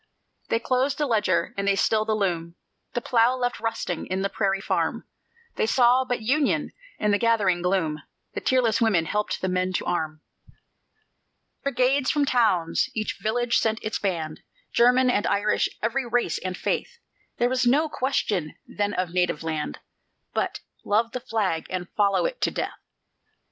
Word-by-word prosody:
They - - +2
closed 255 +4 0
the 295 - +1
ledger 225 -6 +1
and 200 0 -2
they 200 - +4
stilled 215 +2 +1
the 215 - +2
loom, 170 -5 -1 0.4
The 240 - -1
plough 235 +1 +3
left 245 -1 -2
rusting 225 -6 -3
in 190 +1 -2
the 195 - -1
prairie 195 -2 0
farm; 195 - -1 0.5
They - - +1
saw 250 +2 +4
but 245 -3 -2
"Union" 280 +5 +1 0.3
in 210 - +1
the 205 - +2
gathering 205 -7 +2
gloom; 170 -5 0 0.3
The - - -4
tearless 250 -4 +2
women 200 -8 +3
helped 210 +5 -2
the 185 - 0
men 185 0 0
to - - -1
arm; 155 -3 -2 1.4
Brigades 265 0 +1
from 295 -2 +2
towns 205 -11 +2
each 215 -1 -3
village 235 +2 +1
sent 220 -1 +1
its 215 - -2
band: 165 -6 -3 0.3
German 250 +1 +5
and 205 - +1
Irish 205 +1 +1
every 245 +3 0
race 235 -8 0
and 185 -1 -4
faith; - - -2 0.4
There 240 - +3
was 255 0 +1
no 295 +6 +4
question 210 - -1
then 205 0 -2
of 180 -2 -1
native 180 -4 0
land, 155 - -3 0.6
But - - -2 0.2
love 225 +3 +1
the 250 - -3
Flag 215 -9 -1
and 180 -1 -3
follow 205 - +2
it - - -3
to - - +3
death. - - -4
215 Hz, 165 wpm, -25 LUFS, 185-245 Hz, 1.4 s, German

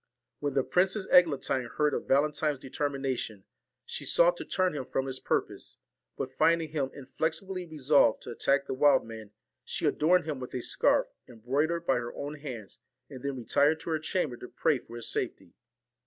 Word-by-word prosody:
When 145 -2 -2
the 135 - +3
Princess 190 +5 +1
Eglantine 140 -7 +4
heard 150 -1 +2
of - - -3
Valentine's 150 +1 +2
determination, 135 -6 -3 0.4
she 475 +1 -5
sought - - +4
to - - -6
turn 185 -2 +1
him 145 - -3
from 135 +1 -2
his 130 -1 -4
purpose; - - -2 0.4
but - - -4
finding 165 -1 +2
him 145 -3 -1
inflexibly 160 +7 -3
resolved 145 -6 +3
to - - -7
attack 140 +3 +1
the - - -3
wild 140 +1 +4
man, 110 -2 -9 0.3
she - - -3
adorned 170 +2 +3
him 150 -4 -3
with 125 0 -7
a 125 - -2
scarf, - - +2 0.2
embroidered 145 +9 -1
by 135 - +3
her 120 0 -5
own 145 +1 -5
hands, 125 -9 -8 0.3
and 130 -2 -8
then 140 0 -3
retired 145 +6 +2
to 165 - -5
her 160 - +1
chamber 155 -6 -2
to 125 - -9
pray 135 - +1
for 115 - -13
his 120 -1 -4
safety. 85 - -3
140 Hz, 180 wpm, -29 LUFS, 130-160 Hz, 0.4 s, Eglantine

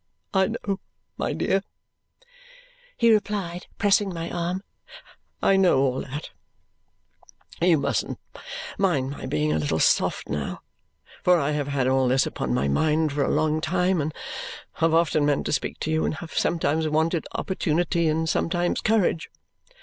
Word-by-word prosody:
"I 190 -1 +4
know, 205 -3 -3 0.4
my - - -2
dear," 195 - +1 1.4
he 230 -1 +5
replied, 200 -5 -1
pressing 205 -1 +3
my 165 -1 -5
arm, 175 +2 -2 0.8
"I 195 - +5
know 185 -6 +4
all 135 -1 +1
that. 145 +3 -7 1.3
You 170 -2 +5
mustn't - - -1 0.6
mind 145 -9 +1
my 145 - -6
being 75 0 0
a 80 - +1
little 75 - 0
soft - - +2
now, 75 -1 -4 0.6
for 180 -1 +5
I 145 0 0
have 145 -2 -1
had 140 -3 0
all 130 0 +3
this 130 +1 +3
upon 65 - -3
my 65 +3 +1
mind 155 - +2
for 145 -1 +1
a - - 0
long 155 +1 +1
time, 180 +1 +1
and 150 +2 -2 0.7
have 165 0 +4
often 160 -2 +3
meant 145 -1 +1
to - - -1
speak 135 - -2
to 155 - -1
you, 160 0 +1
and - - -1
have 165 +1 -9
sometimes 160 -1 +1
wanted 160 +2 +1
opportunity 170 -2 0
and 160 +1 +1
sometimes 175 +2 0
courage. 215 -7 +1
160 Hz, 155 wpm, -25 LUFS, 145-180 Hz, 1.4 s, he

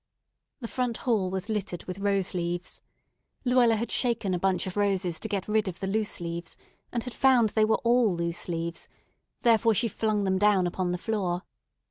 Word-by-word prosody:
The 230 - -4
front 245 -1 -2
hall 215 -7 +2
was 190 0 -4
littered 200 -5 -3
with 185 +1 -7
rose 200 -1 0
leaves. 175 0 -3 0.6
Luella 245 -2 +4
had 230 +2 -3
shaken 230 -6 +1
a 180 - 0
bunch 190 0 +1
of 185 - -5
roses 195 -4 0
to - - -4
get 200 -3 -3
rid 215 0 +1
of 175 -2 -5
the 195 - -3
loose 210 +2 0
leaves, 170 0 -5 0.3
and 235 -2 -2
had 250 - -7
found 250 -3 +4
they 215 +1 +3
were 220 - +2
all 235 -5 +3
loose 170 0 -2
leaves; 170 -1 -3 0.6
therefore 225 -1 +4
she 230 +4 +2
flung 215 -1 -1
them 190 -1 +1
down 205 -3 +4
upon 180 0 -1
the 180 - -1
floor. 185 -3 -2
200 Hz, 190 wpm, -27 LUFS, 180-225 Hz, 0.6 s, Luella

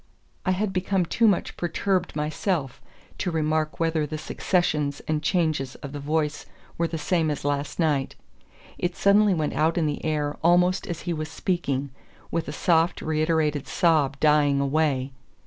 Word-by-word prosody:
I - - +4
had 190 +1 -1
become 185 0 0
too 230 +7 +2
much 200 -4 +1
perturbed 180 +1 -1
myself 150 -1 -2 0.4
to 185 - -1
remark 155 -1 -1
whether 160 -2 +1
the 155 +1 -4
successions 150 -4 0
and 155 -1 0
changes 155 -6 0
of 140 - -8
the 145 - -6
voice 150 +1 -1 0.3
were 170 - 0
the 165 - -4
same 160 0 +1
as 145 -1 -3
last 145 0 -1
night. 150 -5 0 0.6
It 175 0 -1
suddenly 200 0 +4
went 155 -2 -1
out 160 +3 +1
in 165 - +2
the 150 -1 -2
air 150 -2 -1
almost 180 +2 +3
as 170 - -4
he 175 - -2
was 155 -1 -4
speaking, 145 -6 -2 0.4
with 165 - -1
a - - -3
soft 165 +2 +1
reiterated 155 -2 0
sob 150 -5 +2
dying 150 -2 +4
away. 140 -2 +1
155 Hz, 165 wpm, -25 LUFS, 150-175 Hz, 0.6 s, I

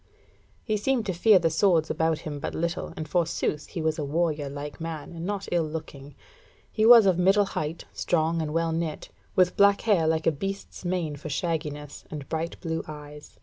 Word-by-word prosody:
He 215 -2 0
seemed 240 +2 0
to 190 - -1
fear 205 +4 +6
the 165 -2 +1
swords 165 -1 +3
about 160 -1 0
him 145 -2 -4
but - - -4
little, 170 +1 -2
and 155 - -4
forsooth 165 -2 -1
he 165 - -5
was 160 0 0
a - - -1
warrior 150 -1 -1
like 145 +3 -7
man, 160 -1 -5
and 170 +1 -5
not 200 -1 -3
ill 175 - +3
looking. 145 -3 -8 0.6
He 220 0 +2
was 235 -3 +9
of 185 -2 +3
middle 195 +3 +4
height, 160 -3 -4
strong 165 -1 0
and 155 -1 -3
well 165 +1 0
knit, 160 -1 -3 0.3
with 180 -1 +3
black 200 0 +5
hair 195 -8 +3
like 160 0 +1
a - - +5
beast's 195 +8 -6
mane 175 -5 -2
for 155 +2 -7
shagginess, 150 -2 -3
and 145 -3 -7
bright 165 +1 -3
blue 160 -2 -2
eyes. 150 -1 -10
165 Hz, 195 wpm, -26 LUFS, 150-180 Hz, 0.6 s, was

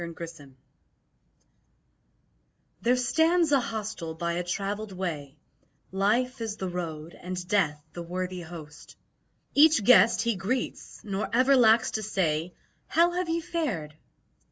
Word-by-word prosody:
Mine 170 -1 -6
Host 170 -2 -8 2.4
There 245 +2 +3
stands 320 +6 +2
a 280 - +5
hostel 215 -8 -5
by 170 +1 -2
a 175 +1 -2
travelled 200 +4 -3
way; 155 -6 -5 0.5
Life 230 +7 0
is 220 -2 -4
the 190 -3 -3
road 165 -2 -5
and 180 0 -5
Death 160 -7 +1
the 175 - -6
worthy 180 +1 -4
host; 160 -3 -11 0.6
Each 295 -5 +6
guest 225 -1 +6
he 235 -2 0
greets, 230 +7 -4
nor 200 0 -3
ever 255 +4 +4
lacks 225 -2 +5
to 220 - -2
say, 175 -5 -1 0.3
"How 340 +2 +3
have 355 0 -2
ye 335 +1 0
fared?" 215 - -3
195 Hz, 130 wpm, -27 LUFS, 170-245 Hz, 2.4 s, Each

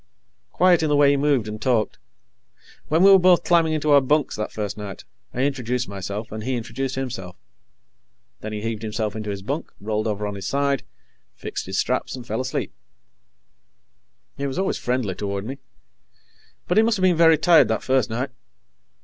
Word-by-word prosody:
Quiet 180 -2 +4
in 155 - 0
the 145 - +3
way 145 -1 +5
he - - +3
moved 140 -5 +1
and 105 0 -6
talked. 115 -3 0 0.9
When 160 +4 +3
we 195 - +8
were 195 - +8
both 180 -1 +5
climbing 165 -2 +3
into 155 -1 0
our 140 -1 +7
bunks, 145 +2 +1
that 105 - -4
first 105 -2 -4
night, 100 -3 -8 0.3
I 125 - -3
introduced 125 -3 -1
myself 100 +2 -6
and 110 0 -6
he 130 +2 -1
introduced 130 +3 -4
himself. 115 -9 -5 1.0
Then 110 - -6
he 105 -1 -4
heaved 115 -2 -3
himself 110 -1 -3
into 110 -1 -5
his 100 -1 -5
bunk, 140 +9 -4
rolled 110 +1 -2
over 105 -1 -2
on 105 - -3
his 100 -1 -6
side, 140 -2 0 0.5
fixed - - -6
his - - -3
straps, - - -1
and 125 -2 -9
fell 110 +1 -2
asleep. 130 0 -3 1.6
He 140 - -2
was 135 - -5
always 190 +1 -1
friendly 125 -6 -1
toward 100 +1 -4
me, 135 +4 -6 1.1
but 180 - +1
he - - +8
must 225 -1 +2
have 185 - -2
been 185 -2 +4
very 165 -1 +6
tired 165 0 +5
that 110 - -1
first 130 -1 +1
night. 125 +4 -3
125 Hz, 190 wpm, -23 LUFS, 105-145 Hz, 1.6 s, we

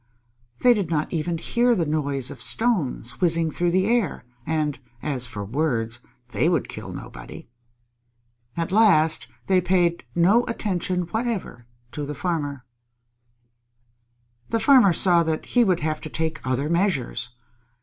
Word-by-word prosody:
They 245 - +6
did 200 -7 -2
not 155 0 -1
even 165 +1 -1
hear 240 +7 +2
the 170 -5 0
noise 140 -4 -1
of - - -10
stones 160 - 0
whizzing 165 -2 +2
through 175 +2 0
the 185 +2 +2
air, 220 - 0 0.2
and 150 -2 -1 0.2
as 130 -5 -1
for 105 -3 -6
words, 120 -2 -1 0.3
they 155 +6 +1
would 170 -6 0
kill - - -8
nobody. - - -10 1.1
At 170 +2 -2
last 185 -7 +4 0.2
they 185 -1 +3
paid 175 -1 +1
no 195 +8 +4
attention 185 -5 -1
whatever 195 - -4 0.2
to 150 - -5
the 150 - -5
Farmer. 145 -6 -3 1.8
The 230 - 0
Farmer 240 -4 +6
saw 175 0 +4
that 160 -1 -2
he 245 - +3
would 185 -6 +1
have 155 0 -2
to 155 - -6
take 160 +1 -2
other 130 +2 -1
measures. 155 -9 0
165 Hz, 140 wpm, -23 LUFS, 150-190 Hz, 1.8 s, They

